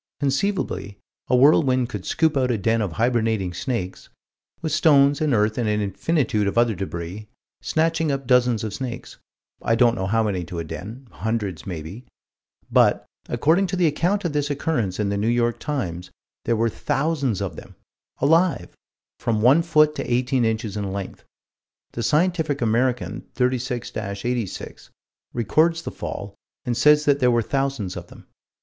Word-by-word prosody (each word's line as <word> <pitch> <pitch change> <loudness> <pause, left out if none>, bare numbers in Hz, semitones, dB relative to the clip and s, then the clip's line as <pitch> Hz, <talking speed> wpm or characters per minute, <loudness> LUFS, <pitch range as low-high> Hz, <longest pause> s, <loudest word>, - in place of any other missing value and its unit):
Conceivably 140 - -1 0.3
a - - +3
whirlwind 130 -2 +4
could 100 -5 -6
scoop 160 -2 +1
out 130 -2 +1
a 120 - +1
den 115 +3 +1
of 100 -6 -2
hibernating 110 -3 0
snakes, 95 -1 -4 0.5
with 160 - -3
stones 145 -2 +4
and 155 -2 +1
earth 110 0 +1
and 115 -3 0
an 105 0 +1
infinitude 105 - 0
of 100 - -2
other 120 -2 +3
débris, 95 +2 -6 0.3
snatching 160 -1 +1
up 135 -1 -3
dozens 125 -3 +3
of 110 -3 -4
snakes 125 -1 -6 0.4
I 115 - +2
don't 120 0 +4
know 95 -5 -3
how 115 +3 +2
many 95 -5 -1
to 85 +1 -7
a 85 - -2
den 110 - -8
hundreds 105 -7 -3
maybe 90 +7 -7 0.6
but, - - +4 0.2
according 160 +11 +2
to 185 - -2
the 180 -1 +2
account 175 +6 +1
of 165 - -1
this 145 0 0
occurrence 135 - -1
in 105 -1 0
the 100 0 -1
New 105 - 0
York 120 0 +1
Times, 90 - -4 0.4
there 115 - +2
were 115 +1 +1
thousands 135 - -1
of 95 -5 -4
them; - - -12 0.4
alive; 160 - +2 0.4
from 110 -2 0
one 135 +7 +6
foot 155 -2 +3
to - - -4
eighteen 125 0 +1
inches 110 -2 -2
in 100 -2 -3
length. 100 -1 -6 0.7
The 115 - -5
Scientific 155 - +1
American, 120 +2 0
36 125 -1 -1
86, 100 +1 -4 0.4
records 155 - +1
the - - -5
fall, 100 0 -6 0.3
and 120 - -1
says 150 +3 +5
that 140 -1 +3
there 125 -2 +4
were 120 -1 +2
thousands 135 -8 -2
of 90 -1 -7
them. - - -15
120 Hz, 165 wpm, -23 LUFS, 105-145 Hz, 0.7 s, one